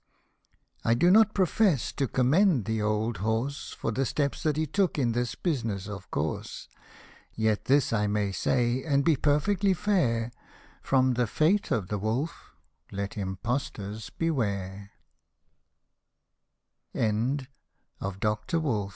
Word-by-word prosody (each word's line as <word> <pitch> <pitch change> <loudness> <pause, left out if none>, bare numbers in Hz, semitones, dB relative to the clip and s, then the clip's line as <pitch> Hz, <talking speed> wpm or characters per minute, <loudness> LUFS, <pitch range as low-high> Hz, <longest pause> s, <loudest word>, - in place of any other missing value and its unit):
I 115 - +3
do 175 +9 +4
not 215 +1 +5
profess 185 - +2
to 135 - -1
commend 135 - +3
the 110 0 -1
old 110 +2 0
horse 110 +7 -2
For 115 - -3
the 130 +5 0
steps 140 -2 -1
that 155 -2 0
he 155 - +1
took 185 +4 0
in 125 -5 +2
this 120 +1 -1
business, 115 - -2
of 100 -2 -8
course; 75 +2 -3 0.7
Yet 110 -1 0
this 140 -3 +3
I 105 -2 +1
may 105 -1 0
say, 120 +4 +1
and 140 -3 +1
be 165 -2 +5
perfectly 185 +8 +2
fair, 120 - +1 0.5
From 130 -1 +2
the 120 -1 +1
fate 170 - +2
of 100 -5 -1
the 105 - -2
wolf, 120 - -3 0.4
let 100 0 -4
impostors 105 +1 -4
125 Hz, 115 wpm, -28 LUFS, 110-155 Hz, 0.7 s, not